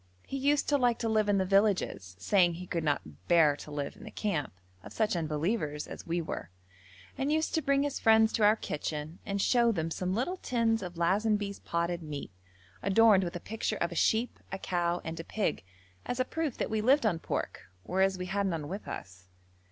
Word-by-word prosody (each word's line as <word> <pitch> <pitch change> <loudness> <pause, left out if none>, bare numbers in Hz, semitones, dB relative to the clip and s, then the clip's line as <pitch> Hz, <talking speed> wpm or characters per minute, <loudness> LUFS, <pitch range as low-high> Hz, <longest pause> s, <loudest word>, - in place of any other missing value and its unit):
He - - -6
used 280 +2 +2
to 290 -1 +3
like 245 -2 +3
to 230 - -2
live 215 -2 +2
in 205 - +3
the 190 - +1
villages, 195 - +1
saying 175 - +3
he 180 +2 -7
could 170 -2 -2
not 90 - -3
bear 160 -4 +5
to 150 - -10
live 145 -1 -4
in - - -14
the 220 - -8
camp 200 -8 -2 0.3
of - - -10
such 215 -3 +1
unbelievers 155 -1 -1
as - - -9
we 170 +1 -1
were, - - -5 0.7
and 275 +2 0
used 315 +1 +1
to 320 - +2
bring 275 0 +2
his 290 -1 -2
friends 220 0 +5
to 220 - +1
our 210 +1 +6
kitchen 150 -3 -4
and 200 0 -1
show 235 +3 +4
them 165 -5 -2
some 185 +2 -2
little 310 - -1
tins 230 - +1
of 175 -2 -7
Lazenby's 200 +3 +1
potted 170 +1 -2
meat, 150 -7 -6 0.5
adorned 200 0 +5
with 175 -1 -4
a - - -3
picture 215 +2 -3
of 170 - -1
a - - -6
sheep, 225 +7 +1
a 190 - -3
cow, 175 -2 -1
and 160 0 -5
a - - -4
pig, 205 - -2 0.4
as 245 - -2
a 255 - +2
proof 315 -2 -3
that - - -2
we 220 -1 +1
lived 260 +3 +4
on 175 -7 +1
pork, - - -4
whereas 190 +1 +1
we 180 - -4
had 195 +2 0
none 165 -5 -2
with 195 +5 -6
us. 95 0 -8
195 Hz, 215 wpm, -30 LUFS, 165-225 Hz, 0.7 s, our